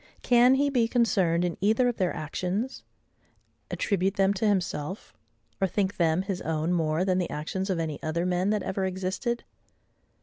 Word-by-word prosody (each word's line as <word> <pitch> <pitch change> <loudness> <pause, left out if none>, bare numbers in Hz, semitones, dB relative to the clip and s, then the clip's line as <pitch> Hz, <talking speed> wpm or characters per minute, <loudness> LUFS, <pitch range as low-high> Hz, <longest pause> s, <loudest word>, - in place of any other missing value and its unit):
Can 245 +1 +5
he 285 +1 +2
be 240 -4 +2
concerned 195 -8 +2
in 175 - -3
either 220 +5 +3
of 245 - -1
their 185 -3 +1
actions? 185 - -3 0.9
attribute 195 -1 0
them 195 0 +3
to 205 +2 0
himself, 185 -2 -2 0.5
or 190 - +3
think 195 +1 -1
them 165 +1 +2
his 195 -2 -4
own 160 +2 -1
more 160 +1 +1
than 185 -1 +1
the 180 - -1
actions 190 +6 -3
of 185 - 0
any 160 -3 -3
other 170 +2 -1
men 180 +2 +1
that 210 -2 0
ever 190 0 -2
existed? 190 +6 -2
190 Hz, 170 wpm, -27 LUFS, 170-215 Hz, 0.9 s, Can